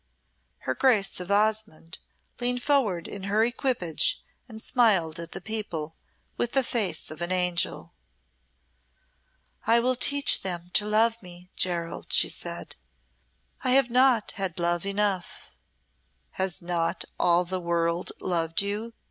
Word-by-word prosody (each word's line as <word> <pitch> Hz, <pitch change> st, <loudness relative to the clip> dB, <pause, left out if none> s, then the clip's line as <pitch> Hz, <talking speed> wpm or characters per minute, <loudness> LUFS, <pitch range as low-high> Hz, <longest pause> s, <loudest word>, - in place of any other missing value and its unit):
Her -, -, -2 dB
Grace 220 Hz, -9 st, +2 dB
of 180 Hz, +1 st, -7 dB
Osmonde 210 Hz, -5 st, 0 dB, 0.4 s
leaned 245 Hz, 0 st, 0 dB
forward 225 Hz, -, +1 dB
in 195 Hz, -1 st, -7 dB
her 210 Hz, +2 st, +2 dB
equipage 235 Hz, -, 0 dB, 0.3 s
and 220 Hz, -1 st, -9 dB
smiled 195 Hz, -10 st, +2 dB
at 170 Hz, 0 st, -7 dB
the 190 Hz, -, -7 dB
people 180 Hz, -7 st, -4 dB, 0.4 s
with 240 Hz, -, -1 dB
the 270 Hz, -, +3 dB
face 230 Hz, -9 st, 0 dB
of 155 Hz, -, -9 dB
an 175 Hz, +1 st, -1 dB
angel. 180 Hz, -2 st, 0 dB, 1.7 s
"I 230 Hz, +1 st, +5 dB
will 255 Hz, +2 st, +1 dB
teach 285 Hz, +3 st, +3 dB
them 175 Hz, -2 st, -4 dB
to 210 Hz, -, +3 dB
love 225 Hz, +2 st, +2 dB
me, 180 Hz, 0 st, -12 dB
Gerald," 170 Hz, -2 st, -2 dB
she -, -, +4 dB
said. -, -, -6 dB, 0.9 s
"I 255 Hz, -1 st, +2 dB
have 270 Hz, -2 st, +4 dB
not 250 Hz, -3 st, +4 dB
had 190 Hz, -4 st, -3 dB
love 175 Hz, +2 st, 0 dB
enough." 200 Hz, -, -2 dB, 0.8 s
"Has 190 Hz, -2 st, -3 dB
not 170 Hz, -1 st, -2 dB
all 175 Hz, +1 st, +3 dB
the 185 Hz, +1 st, -3 dB
world 170 Hz, 0 st, -1 dB
loved 165 Hz, -3 st, 0 dB
you?" 210 Hz, +3 st, -4 dB
195 Hz, 135 wpm, -26 LUFS, 175-230 Hz, 1.7 s, I